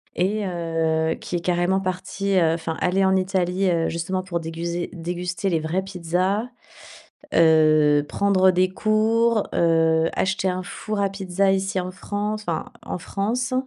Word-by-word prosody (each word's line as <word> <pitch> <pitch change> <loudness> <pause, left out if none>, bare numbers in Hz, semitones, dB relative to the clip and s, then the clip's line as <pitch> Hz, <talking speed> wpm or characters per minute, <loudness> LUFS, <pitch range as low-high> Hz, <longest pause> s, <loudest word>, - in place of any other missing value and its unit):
et 205 +3 0
heu, 165 -2 -1
qui - - -6
est 175 - -1
carrément 180 +2 +1
parti, 190 +1 -2
heu 165 -1 +3
enfin, 165 -1 -4
allé 190 +2 +1
en 190 0 +3
Italie, 185 0 0
heu, 165 -2 +1
justement, 185 +3 -3
pour 175 -2 -3
déguser 170 +1 -4
déguster 180 +2 -3
les 165 -3 +1
vraies 160 +4 -1
pizzas, 185 +3 -1 0.9
heu, 155 -2 +5
prendre 190 -2 +3
des 185 +1 +2
cours, 220 +2 +2
heu, 165 -1 +3
acheter 190 0 0
un 185 0 -2
four 210 +3 -4
à 200 - +1
pizza, 195 0 0
ici 195 0 -1
en 180 0 -5
France, 210 +3 -4
enfin, 165 - -3
en - - -5
France 225 +8 -2
185 Hz, 155 wpm, -23 LUFS, 165-195 Hz, 0.9 s, heu